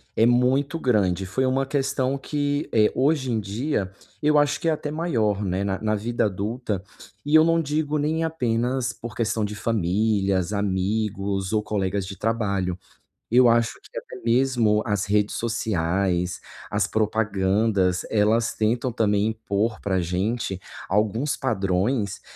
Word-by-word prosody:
é 110 - +4
muito 130 +6 +2
grande, 95 - +1
foi 115 +8 -1
uma 135 +1 +1
questão 135 -1 0
que 145 +1 -2
é, 105 -2 +4
hoje 135 -1 +1
em 110 - 0
dia, 105 0 -2 0.3
eu 150 0 +3
acho 145 0 +2
que 165 - +1
é - - +3
até 150 -1 -3
maior, 115 - 0
né, 95 +1 -1
na 95 0 -2
na 110 0 +1
vida 115 +3 -1
adulta 105 +1 -3 0.4
e 150 +2 +2
eu 155 - +8
não 165 0 +3
digo 150 0 -1
nem 155 +2 0
apenas 125 -4 -1
por 120 -1 -8
questão 110 -1 0
de 105 0 -3
famílias, 100 -2 0
amigos 100 0 -1
ou 110 -1 +2
colegas 100 -2 -2
de 95 -1 -8
trabalho. 100 -5 -1 0.5
Eu 120 +1 +6
acho 115 0 +2
que - - -12
até - - -12
mesmo 115 -3 +2
as 105 -3 0
redes 105 +1 +1
sociais, 90 -5 -1 0.3
as 100 -1 +1
propagandas, 105 -3 +1
elas 110 +2 +2
tentam 120 +4 0
também, 105 -3 +1
impor 110 0 -2
para 95 -2 -1
a - - +2
gente 95 +3 -2 0.3
alguns 110 +8 0
padrões 100 -1 -1
110 Hz, 150 wpm, -24 LUFS, 100-130 Hz, 0.5 s, eu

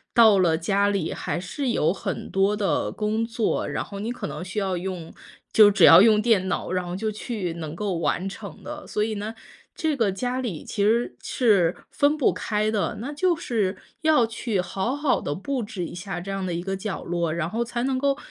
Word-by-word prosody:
到 220 -4 +7
了 165 -3 +3
家 200 +4 +1
里 195 -5 -1
还 - - -3
是 255 +9 -3
有 170 -8 +2
很 - - -5
多 195 +2 +2
的 205 -2 0
工 215 +1 -1
作， 230 -1 -1
然 - - -2
后 200 -1 -8
你 220 +4 -3
可 245 -4 -5
能 185 - -5
需 180 +2 -8
要 195 -3 0
用 175 -2 -5 0.4
就 215 -2 +8
只 200 - +2
要 - - +10
用 215 0 +6
电 210 -4 +2
脑， 180 - -2
然 185 0 0
后 175 - -4
就 215 +3 -2
去 210 -4 -4
能 160 -2 -6
够 200 0 -2
完 180 +2 0
成 195 -3 -9
的。 300 0 -8
所 210 - 0
以 215 0 -2
呢， 210 +2 -5 0.4
这 315 -3 0
个 225 -7 +1
家 250 +6 -2
里 205 -11 -4
其 205 - -2
实 230 +4 +2
是 195 -8 +2 0.2
分 290 +1 +2
不 290 - +3
开 215 0 -1
的， 210 0 -1
那 265 +7 -5
就 350 +4 +2
是 210 -10 -1 0.2
要 310 -6 +4
去 225 -2 -2
好 190 +7 -2
好 290 -2 +1
地 145 - -2
布 250 - -3
置 195 -4 -5
一 - - -8
下 180 0 -5
这 180 +3 -8
样 195 -1 -3
的 180 - -2
一 170 - -2
个 195 +2 -3
角 195 0 -4
落， 170 -2 -1
然 170 -1 -2
后 230 +5 -1
才 240 0 -3
能 265 0 0
够 275 +1 +1
205 Hz, 240 characters per minute, -25 LUFS, 185-235 Hz, 0.4 s, 要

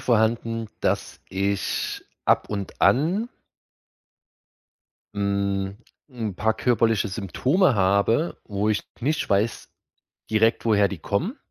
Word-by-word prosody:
vorhanden, 115 0 +1
dass - - -1
ich 100 +1 -1 0.2
ab - - +2
und 100 -2 -5
an 180 - +3 1.9
hm, 100 -1 -1 0.3
'n 115 -7 -4
paar 110 +4 +1
körperliche 115 -3 +2
Symptome 125 - +1
habe, 100 - +2
wo 105 0 -1
ich 105 - 0 0.2
nicht 150 +5 0
weiß, 105 +2 0 0.6
direkt, 110 +1 +3
woher 105 -3 +4
die 100 - -6
kommen 180 - -2
110 Hz, 105 wpm, -24 LUFS, 100-120 Hz, 1.9 s, woher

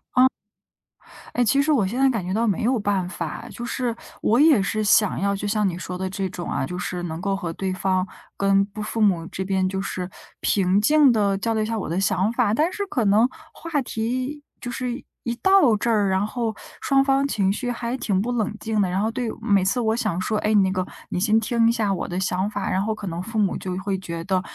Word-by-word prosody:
嗯。 255 +1 +7 1.1
哎， 245 - +2
其 275 +5 +3
实 305 +2 +2
我 220 -10 +3
现 235 +6 -3
在 270 - +5
感 225 -8 -1
觉 185 - -3
到 230 +3 +1
没 200 -2 0
有 245 +1 +2
办 200 -3 0
法， 230 +4 -5
就 240 - -7
是 240 -1 -2 0.3
我 230 - +3
也 295 -10 +6
是 215 +2 -1
想 205 -1 +4
要 200 +1 +1
就 205 - -4
像 210 -1 +1
你 175 - -3
说 180 0 -5
的 190 0 -2
这 190 0 -3
种 175 -2 -6
啊， - - -1
就 180 +3 -5
是 180 0 -3
能 160 -1 -5
够 195 +1 0
和 175 -4 -4
对 190 +2 -3
方 185 0 0 0.3
跟 195 0 +3 0.2
父 225 - -3
母 185 -6 +3
这 190 - -4
边 190 -1 +1
就 190 0 -3
是 185 -1 -4 0.3
平 195 0 +2
静 295 +4 +5
地 200 -3 +2
交 225 +3 -1
流 220 - +1
一 - - -1
下 225 0 -2
我 - - -4
的 170 +4 -1
想 195 +2 +1
法， 210 -3 +2
但 315 +9 +1
是 405 -1 -3
可 260 - -1
能 215 +5 +5 0.2
话 320 -4 -2
题 255 +5 -3 0.2
就 245 - -5
是 250 +1 -4 0.2
一 235 -1 -1
到 380 - +5
这 230 +3 -1
儿， 205 -3 +3
然 190 +1 +1
后 225 0 -2 0.3
双 270 0 +3
方 275 0 +2
情 200 -8 +1
绪 245 +4 -4
还 240 +1 -2
挺 195 -6 0
不 240 - -2
冷 220 -3 -1
静 220 -2 -1
的。 190 - +2
然 185 +3 0
后 220 - +1
对 245 0 -3
每 200 -2 +3
次 245 +6 +1
我 220 0 +1
想 210 -7 -1
说： 215 +3 -1
“哎， 215 +1 +1
那 195 -2 +4
个， 185 -1 -1 0.2
你 - - -3
先 215 +3 +3
听 230 +1 +2
一 - - +4
下 215 -4 0
我 185 - -2
的 180 +1 -3
想 185 +1 0
法。 205 -2 -3
“然 190 - +1
后 220 +2 -1
可 205 -3 -6
能 170 0 -4
父 220 +4 -7
母 205 -3 +2
就 185 -1 -4
会 190 0 -2
觉 170 -3 -5
得， 185 +1 0
210 Hz, 265 characters per minute, -23 LUFS, 190-235 Hz, 1.1 s, 嗯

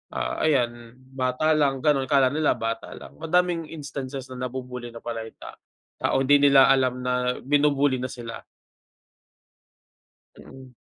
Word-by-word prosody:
ah, - - -3
ayan, 120 -5 0 0.2
bata 130 +4 0
lang 140 -4 +1
ganun. 140 -3 +2
Akala 135 -3 +3
nila 155 +1 +1
bata 115 0 -4
lang, - - -13
madaming 170 0 0
instances 135 -3 -7
na 130 0 -4
nabu-bully 125 -1 -7
na 115 0 -12
pala 115 -1 -5
yung - - -15
ta - - -12 0.4
tao. 135 - +1
Hindi 145 +1 +5
nila 135 -1 +6
alam 130 -1 +1
na 125 0 0
binu-bully 145 -1 +2
na 130 - -3
sila. 120 -3 -8 2.0
Mm. 130 -1 -14
130 Hz, 145 wpm, -24 LUFS, 125-145 Hz, 2.0 s, nila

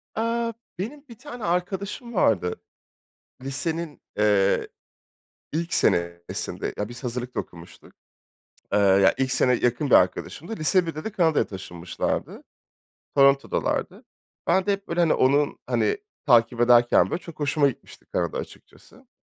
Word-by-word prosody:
Aaa, 230 +1 -1 0.3
benim 275 +9 -5
bir 230 - -12
tane 245 -4 -9
arkadaşım 190 +7 -2
vardı. 95 - +2 0.9
Lisenin, 155 +4 -4 0.2
eee, 100 -2 +3 0.9
ilk 170 +3 -2
senesinde 85 0 -1
ya 105 - -2
biz 120 +2 -10
hazırlık 125 +1 -4
da - - 0
okumuştuk. 85 0 -13 0.8
Eee, - - +4
ya 95 -1 +5
ilk 130 -1 0
sene 125 0 +3
yakın 120 +4 0
bir - - +6
arkadaşımdı. 185 +9 +1
Lise 175 +3 +2
1'de 155 -1 -5
de 220 - -3
Kanada'ya 165 -6 +2
taşınmışlardı. 90 -3 -4 0.7
Toronto'dalardı. 140 0 +2 0.4
Ben 190 - +3
de 205 - +2
hep 195 0 -6
böyle, 170 +1 -2
hani, 165 -2 +4
onun, 140 +2 +2
hani, 420 - +1 0.3
takip 120 -3 +4
ederken 120 -6 +5
böyle 175 - -3
çok 165 -3 -12
hoşuma 145 0 +2
gitmişti 130 - -12
Kanada - - -1
açıkçası. - - -12
140 Hz, 135 wpm, -25 LUFS, 115-180 Hz, 0.9 s, bir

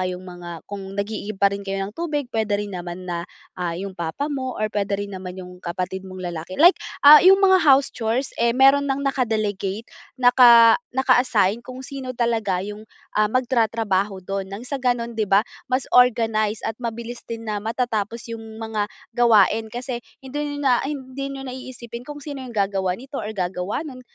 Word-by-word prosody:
kayong 185 0 -3
mga 175 -1 -9 0.2
kung 195 -1 -7
nag-iigib 205 0 -4
pa 200 0 +4
rin 200 - -4
kayo 195 0 -3
ng 205 - -9
tubig, 305 -4 -2
puwede 220 -2 0
rin 205 -1 -4
naman 175 +1 -6
na, 170 -1 -3 0.3
ah, 175 -2 -3
yung 195 0 -6
papa 170 - -3
mo 265 -4 -4
or 215 - +1
puwede 200 -1 0
rin 200 - -9
naman 185 0 -7
yung 180 -1 -10
kapatid 185 +2 -4
mong 185 -1 -10
lalaki. 175 0 -6
Like, 345 +5 +8 0.3
ah, 300 +1 +11
yung 380 +2 +7
mga 380 -3 +5
house 275 -2 +4
chores 235 +3 -2
eh, 235 - +4
meron 270 +3 +4
ng 275 +1 -1
naka-delegate, 215 -5 -1 0.3
naka 245 -2 +7 0.2
naka-assign 245 -5 +3
kung 255 +2 -9
sino 260 -2 -6
talaga 220 -6 0
yung, 210 +1 -8 0.2
ah, 210 0 +2
magtatrabaho 220 -5 0
dun 195 0 -3
ng 200 +4 -7
sa 270 +2 -4
ganon, 240 -2 0
di 220 -2 -2
ba, 195 +3 +4 0.2
mas 255 +1 0
organize 225 -3 +3
at 225 - -1
mabilis 235 0 -5
din 230 -1 -6
na 210 -2 -3
matatapos 225 0 -2
yung 230 - -6 0.2
mga 220 -2 -3 0.2
gawain. 225 -2 +4
Kasi 245 +2 -5 0.2
hindi 290 +2 -4
niyo - - -6
na 250 -3 +4
hindi 275 -1 -5
niyo 275 -1 -7
na 255 - -6
iisipin 245 -2 -8
kung 295 0 -7
sino 285 -3 -6
yung 250 -3 -9
gagawa 195 -2 0
nito 270 +5 -7
or 210 - -5
gagawa 180 - -2
no'n, 260 -5 -9
225 Hz, 185 wpm, -22 LUFS, 195-255 Hz, 0.3 s, ah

